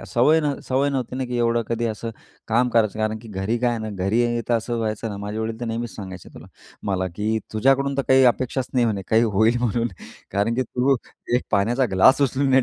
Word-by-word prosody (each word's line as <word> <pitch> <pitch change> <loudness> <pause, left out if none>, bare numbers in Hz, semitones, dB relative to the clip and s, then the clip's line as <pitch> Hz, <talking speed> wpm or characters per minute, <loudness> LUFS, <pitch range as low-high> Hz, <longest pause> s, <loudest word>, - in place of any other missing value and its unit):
अ, - - -9
सवय 150 +7 +4
नव्ह 145 -3 -2
सवय 135 +2 +2
नव्हती 130 -2 -3
ना, 130 - -1
की 125 -1 -4
एवढं 115 0 +2
कधी 115 0 -1
असं 115 +1 -4 0.4
काम 120 +3 +3
करायचं. 110 -3 +1
कारण 110 0 -1
की 115 +1 -13
घरी 100 +3 -2
काय 120 0 +1
आहे 120 - -2
ना, 110 -1 -5
घरी 120 +4 +1
तर 120 - +3
असं 115 +1 -1
व्हायचं 110 0 -2
ना, 105 - -5
माझे 105 +2 -5
वडील 110 +1 -3
तर - - -2
नेहमीच 115 +1 -4
सांगायचे 95 -3 -8
तुला - - -11 0.4
मला, 95 -1 0
की 110 +2 0
“तुझ्याकडून 135 +5 +2
तर 140 - +1
काही 130 0 +6
अपेक्षाच 130 +1 -3
नाही," 125 -2 +3
म्हणे 100 -3 -1
"काही 110 +1 +4
होईल 110 +3 +4
म्हणून, 120 0 0 0.4
कारण 100 +4 +1
की 130 - +1
तू 130 +2 +1 0.4
एक 125 - -1
पाण्याचा 120 +6 +2
ग्लास 95 +10 +5
उचलून 135 0 +1
नाही 130 0 +5
115 Hz, 230 wpm, -23 LUFS, 110-130 Hz, 0.4 s, काही